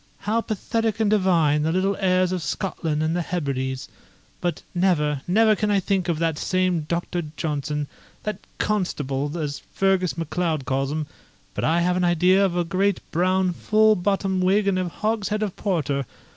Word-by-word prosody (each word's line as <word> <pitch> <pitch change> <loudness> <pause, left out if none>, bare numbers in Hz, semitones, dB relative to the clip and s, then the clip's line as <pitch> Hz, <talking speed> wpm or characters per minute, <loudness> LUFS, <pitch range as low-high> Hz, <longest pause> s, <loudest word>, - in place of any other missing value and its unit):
_' - - -35 0.2
How 220 +2 +1
pathetic 225 0 -2
and 215 -2 +2
divine 170 -7 +3
the 160 +2 +1
little 190 +3 +1
airs 185 -2 +2
of 185 -1 -1
Scotland 155 -2 -2
and 160 +1 0
the 175 - 0
Hebrides! 135 -6 -3 0.5
But 175 -1 -2
never, 155 -6 +1
never 215 +4 +4
can 210 0 -1
I 200 -1 +3
think 190 -1 0
of 165 - +1
that 165 -2 0
same 185 -4 0
Doctor 175 0 -2
Johnson 150 -1 -2 0.4
that 210 -2 -3 0.2
CONSTABLE, 145 -7 -1
as 150 -3 -3
Fergus 190 -3 +1
MacLeod 165 -3 -1
calls 135 0 0
him 155 0 -2 0.5
but - - -3
I 165 +2 +3
have 180 +1 +1
an 180 - +1
idea 180 +3 +4
of 180 -3 +1
a 175 - +2
great 190 +3 +1
brown 185 +2 +2
full 215 +4 +3
bottomed 190 0 0
wig 200 +2 +3
and 190 -2 +2
a 180 -1 -1
hogshead 215 +2 -1
of 200 -4 -3
porter! 145 - -1
180 Hz, 175 wpm, -24 LUFS, 155-195 Hz, 0.5 s, never